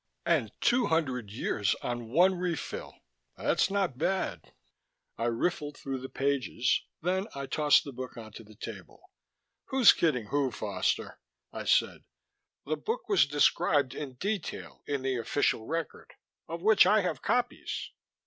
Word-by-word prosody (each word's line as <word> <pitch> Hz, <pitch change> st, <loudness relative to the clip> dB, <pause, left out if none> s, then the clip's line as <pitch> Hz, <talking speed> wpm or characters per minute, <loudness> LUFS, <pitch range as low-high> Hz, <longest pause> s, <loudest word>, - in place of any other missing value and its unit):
"And -, -, +2 dB
two 245 Hz, 0 st, +3 dB
hundred 130 Hz, -9 st, 0 dB
years 105 Hz, -2 st, 0 dB
on 120 Hz, -2 st, -4 dB
one 180 Hz, +9 st, +5 dB
refill 180 Hz, -3 st, -4 dB, 0.4 s
that's -, -, +2 dB
not 190 Hz, -10 st, -1 dB
bad." 185 Hz, -, -1 dB, 0.6 s
I 115 Hz, -, -2 dB
riffled 145 Hz, +5 st, -1 dB
through 135 Hz, -1 st, -4 dB
the 130 Hz, -, -7 dB
pages, 135 Hz, -3 st, 0 dB, 0.2 s
then 190 Hz, +3 st, 0 dB
I 140 Hz, 0 st, -4 dB
tossed 150 Hz, +1 st, +4 dB
the 140 Hz, -, -7 dB
book 130 Hz, 0 st, -7 dB
onto 110 Hz, 0 st, -9 dB
the 110 Hz, 0 st, -16 dB
table. -, -, -9 dB, 0.7 s
"Who's 265 Hz, -4 st, +6 dB
kidding 125 Hz, -10 st, 0 dB
who, 140 Hz, -2 st, +1 dB
Foster?" 100 Hz, -5 st, -2 dB, 0.3 s
I -, -, -5 dB
said. -, -, +2 dB, 0.6 s
"The 155 Hz, +2 st, -1 dB
book 485 Hz, +3 st, -3 dB
was 400 Hz, -, +5 dB
described 145 Hz, -1 st, +2 dB
in 140 Hz, -2 st, -6 dB
detail 200 Hz, +5 st, -4 dB
in 140 Hz, -2 st, -2 dB
the 135 Hz, -1 st, 0 dB
official 115 Hz, -1 st, 0 dB
record, 165 Hz, 0 st, -4 dB, 0.4 s
of 165 Hz, +1 st, -6 dB
which 215 Hz, -3 st, +6 dB
I 210 Hz, +2 st, +5 dB
have 180 Hz, -, -2 dB
copies. 245 Hz, +3 st, -1 dB
145 Hz, 145 wpm, -29 LUFS, 125-180 Hz, 0.7 s, Who's